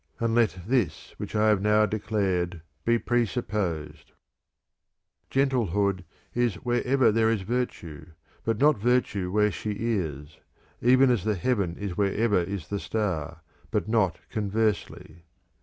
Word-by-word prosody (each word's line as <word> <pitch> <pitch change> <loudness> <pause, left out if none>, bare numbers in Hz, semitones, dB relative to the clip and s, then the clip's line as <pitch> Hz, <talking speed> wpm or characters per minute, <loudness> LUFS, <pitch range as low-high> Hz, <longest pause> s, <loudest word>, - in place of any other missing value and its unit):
And 115 -1 0
let 115 -5 +2
this 110 - -1
which - - -6
I 110 +1 +4
have 105 -3 +3
now 105 +1 +4
declared 95 -6 -1 0.2
be 115 0 +4
presupposed. 105 - -2
[loo] - - -33 1.2
VI 135 +1 +3
Gentlehood 100 -7 0 0.3
is 120 -5 +1
wherever 125 0 +2
there 110 +1 +3
is 110 -4 0
virtue, 95 - -4 0.4
but 115 -1 0
not 145 -2 +4
virtue 105 -5 +1
where 105 +1 +3
she 105 +2 -4
is; 80 -10 -3 0.4
even 130 +2 +5
as 115 -7 +1
the 105 0 0
heaven 95 -3 0
is 100 -4 -5
wherever 105 +1 +2
is 85 -3 -5
the 100 - -2
star, 85 -8 -3 0.3
but - - -1
not 110 -6 +2
conversely. 105 -5 -2
105 Hz, 140 wpm, -26 LUFS, 95-115 Hz, 1.2 s, even